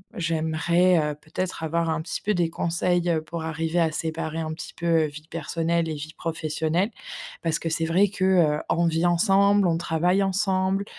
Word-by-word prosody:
j'aimerais, 170 +2 +2 0.2
heu, - - -11
peut-être 165 +3 -5
avoir 165 +1 0
un 160 0 -1
petit 160 - -5
peu 210 - 0
des 175 -3 +1
conseils, 175 +1 0
heu, 160 -2 +1
pour 165 0 -6
arriver 160 +1 -1
à 165 -2 +2
séparer 160 0 -3
un 160 -1 -3
petit 155 - -8
peu 165 -2 +2
vie 150 +1 -9
personnelle 165 +1 -1
et - - -2
vie 150 +1 -7
professionnelle. 160 +4 -1 0.5
Parce 165 -1 0
que 165 - -3
c'est 160 0 0
vrai 185 +5 +3
que, 190 -1 -2
heu, 170 -6 +3
on 170 0 +2
vit 165 +1 +1
ensemble, 195 +2 +4
on 165 - +1
travaille 175 +3 +1
ensemble 195 0 0
165 Hz, 185 wpm, -25 LUFS, 160-180 Hz, 0.5 s, ensemble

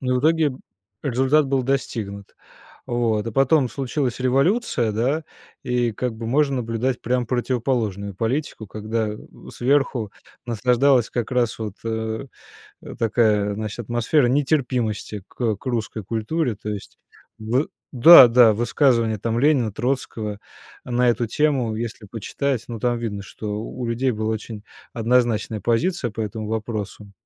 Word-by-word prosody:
Но 125 -1 0
в - - 0
итоге 155 -2 +3 0.5
результат 135 +3 +2
был 135 -1 +1
достигнут. 110 -7 -3 0.5
Вот, 115 -3 0
а - - -2
потом 135 +1 +3
случилась 130 -1 -2
революция, 135 - +1
да, 135 +9 0 0.4
и 120 -2 0
как 125 +2 -3
бы 115 0 -6
можно 140 +2 +2
наблюдать 120 +1 -1
прям 125 0 0
противоположную 115 -5 -1
политику, 115 +2 -2
когда, 110 +2 -2
э, 105 - -5 0.4
сверху 130 -4 +1 0.4
насаждалась 125 +2 +3
как 120 -3 -3
раз 125 -3 0
вот, 105 -2 -5
э, 110 +2 -3 0.7
такая, 105 -3 +2
значит, 110 +2 -5
атмосфера 120 +4 +1
нетерпимости 125 - -1
к 115 -4 -1
к - - -21
русской 115 -3 -3
культуре. 115 - -1
То 105 +1 -6
есть 105 -2 -7 0.4
в 120 +7 0 0.3
Да-да, 125 -5 +9
высказывания 115 -1 +2
там 115 +3 -1
Ленина, 135 -6 +3
Троцкого 110 -4 -3 0.5
на 125 0 +1
эту 120 0 +1
тему 130 -5 +1
если 115 -1 -5
почитать, 120 +4 -3
ну, 115 -2 -6
там 120 -1 0
видно, 105 -4 -4
что 105 +1 -5
у 120 +2 -5
людей 120 +3 0
была 110 0 -2
очень 110 -1 -7 0.3
однозначная 115 -2 +1
позиция 120 - 0
по 110 - -6
этому 110 0 -4
вопросу. 105 -2 -4
120 Hz, 135 wpm, -22 LUFS, 110-130 Hz, 0.7 s, Да-да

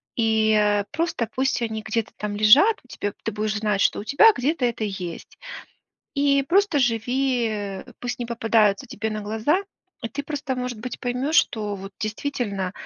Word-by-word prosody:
и, 220 -1 +2
э, 205 -1 +2
просто 310 -7 -1
пусть 265 -1 0
они 220 -2 -3
где-то 220 0 -2
там 210 -1 -4
лежат, 270 - +6
у - - -24
тебя, 205 -4 -4
ты 225 - -2
будешь 215 0 -2
знать, 210 -1 0
что - - +2
у - - -5
тебя 425 - +6
где-то 275 +1 0
это 235 -2 -1
есть. 185 -5 -6 0.8
И 280 -1 +2
просто 370 0 +3
живи, 245 0 +1
э, 205 -3 -5
пусть 245 0 -4
не 240 - -2
попадаются 225 -3 +2
тебе 220 +2 -4
на 215 0 -3
глаза. 220 - +1 0.4
И 230 - -4
ты, 285 - -5
просто, 285 -2 -3
может 250 -2 -4
быть, 250 +3 -6
поймёшь, 250 +5 -2
что 210 -10 +2
вот 195 0 -8
действительно 215 -4 -3
230 Hz, 175 wpm, -23 LUFS, 210-265 Hz, 0.8 s, лежат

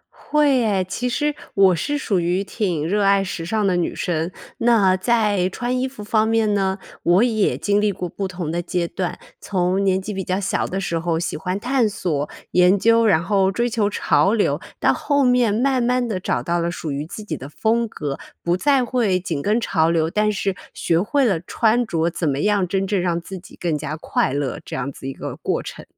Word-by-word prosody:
会 295 -3 +2
耶， 205 -6 +1
其 245 +6 -2
实 295 +4 0 0.2
我 195 -2 +5
是 290 - -1
属 210 -9 0
于 175 +3 0
挺 180 -7 -2
热 205 +4 +1
爱 195 0 +4
时 180 -3 -5
尚 215 +4 0
的 190 -2 +2
女 175 -1 -1
生。 170 -1 -2 0.3
那 220 -6 +4
在 205 -2 +1
穿 245 +5 -2
衣 260 - 0
服 255 -5 -9
方 215 +1 +2
面 225 -2 +2
呢， 190 -1 0 0.2
我 175 +5 +4
也 220 -4 +1
经 205 0 +1
历 210 -1 +2
过 180 -2 -4
不 195 +3 -4
同 180 -4 -4
的 170 +1 -1
阶 175 -1 -2
段。 180 0 -3 0.2
从 185 0 0
年 190 -1 +2
纪 200 +2 -5
比 190 -1 -3
较 185 +1 -1
小 195 - -1
的 190 - -3
时 170 -3 -2
候 165 -1 -1
喜 170 - -3
欢 180 +5 -3
探 245 0 +1
索 155 -7 -2 0.2
研 180 +2 +5
究， 230 +3 +4
然 170 -6 +3
后 195 -1 +2
追 235 +5 0
求 220 -3 0
潮 205 0 +2
流， 225 - +1 0.2
到 - - +3
后 285 -1 +1
面 250 -4 +3
慢 255 +3 +1
慢 245 +1 +1
地 205 -5 -2
找 185 - -1
到 175 0 0
了 170 0 0
属 165 -3 -5
于 145 +2 -3
自 215 - -8
己 175 -7 -4
的 135 0 -8
风 230 +8 0
格， 145 -9 -5 0.2
不 175 +1 +1
再 270 +4 +2
会 230 -7 +1
紧 165 -5 -3
跟 215 +7 +1
潮 165 -8 +1
流， 165 -1 +1
但 210 +2 +2
是 195 -2 -1 0.2
学 170 0 +1
会 275 +7 +1
了 195 -8 +2
穿 230 +5 +1
着 165 -3 0
怎 165 -2 -1
么 135 0 -1
样 205 -3 +2
真 195 +2 0
正 195 -1 0
让 175 -1 0
自 185 +2 -8
己 180 - -15
更 170 -3 0
加 150 +1 -4
快 155 - 0
乐 140 -2 -2
这 - - -7
样 140 +3 -3
子 135 - -9
一 135 - -4
个 - - -6
过 - - -2
程。 - - -8
195 Hz, 240 characters per minute, -21 LUFS, 175-225 Hz, 0.3 s, 我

